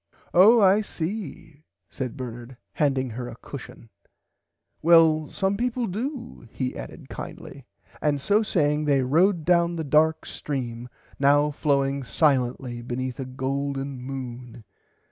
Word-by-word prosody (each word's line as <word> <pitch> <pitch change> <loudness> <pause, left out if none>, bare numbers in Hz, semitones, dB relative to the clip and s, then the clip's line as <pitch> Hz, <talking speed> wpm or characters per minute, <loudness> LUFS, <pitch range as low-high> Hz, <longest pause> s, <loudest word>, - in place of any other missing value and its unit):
Oh 215 +7 +7
I 200 +1 +5
see 165 -5 -6 0.3
said 130 -1 -5
Bernard 120 0 -7 0.2
handing 135 -4 0
her 120 +2 -5
a 115 - -9
cushon 125 -2 -10 0.9
well 160 -2 +5
some 195 0 -1
people 245 +1 -1
do 240 - -5
he 130 -1 -3
added - - -9
kindly - - -9 0.3
and 145 -2 +1
so 205 +9 +2
saying 150 -7 +1
they 140 -3 +3
rowed 165 +5 +2
down 170 -1 +3
the 165 - -3
dark 155 +2 +2
stream 125 -4 -5 0.3
now 145 +2 +4
flowing 140 -2 0
silently 125 -3 0
beneath 125 +1 -4
a 135 - -3
golden 135 +1 -3
moon. 125 -3 -7
145 Hz, 125 wpm, -25 LUFS, 130-170 Hz, 0.9 s, Oh